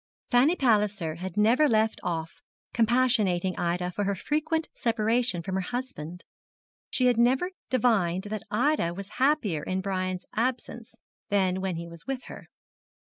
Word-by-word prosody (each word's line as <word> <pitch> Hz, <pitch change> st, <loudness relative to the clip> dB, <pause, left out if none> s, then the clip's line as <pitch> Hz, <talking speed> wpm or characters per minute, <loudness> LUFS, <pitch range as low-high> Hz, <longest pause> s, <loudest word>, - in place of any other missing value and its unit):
Fanny 270 Hz, +7 st, +5 dB
Palliser 210 Hz, -, +1 dB
had 185 Hz, 0 st, -6 dB
never 240 Hz, +8 st, +4 dB
left 220 Hz, -1 st, +2 dB
off 165 Hz, -2 st, -4 dB, 0.3 s
compassionating 225 Hz, -6 st, +2 dB
Ida 180 Hz, +1 st, -1 dB
for 205 Hz, +3 st, -2 dB
her 200 Hz, 0 st, 0 dB
frequent 310 Hz, -, -1 dB
separation 225 Hz, -, +1 dB
from 190 Hz, +1 st, -4 dB
her 190 Hz, -, 0 dB
husband. 180 Hz, -7 st, -5 dB, 0.7 s
She 255 Hz, -, +2 dB
had 245 Hz, -2 st, +3 dB
never 260 Hz, +10 st, +3 dB, 0.2 s
divined 200 Hz, -8 st, +2 dB
that 215 Hz, -, -3 dB
Ida 225 Hz, -, +1 dB
was 200 Hz, +1 st, -7 dB
happier 260 Hz, -, +2 dB
in 185 Hz, +4 st, -2 dB
Brian's 185 Hz, -1 st, -2 dB
absence 240 Hz, 0 st, -3 dB, 0.3 s
than 190 Hz, -2 st, +1 dB
when 190 Hz, -2 st, -2 dB
he 170 Hz, +1 st, -6 dB
was 170 Hz, +4 st, -12 dB
with 270 Hz, -2 st, -3 dB
her. -, -, -11 dB
210 Hz, 145 wpm, -27 LUFS, 185-250 Hz, 0.7 s, Fanny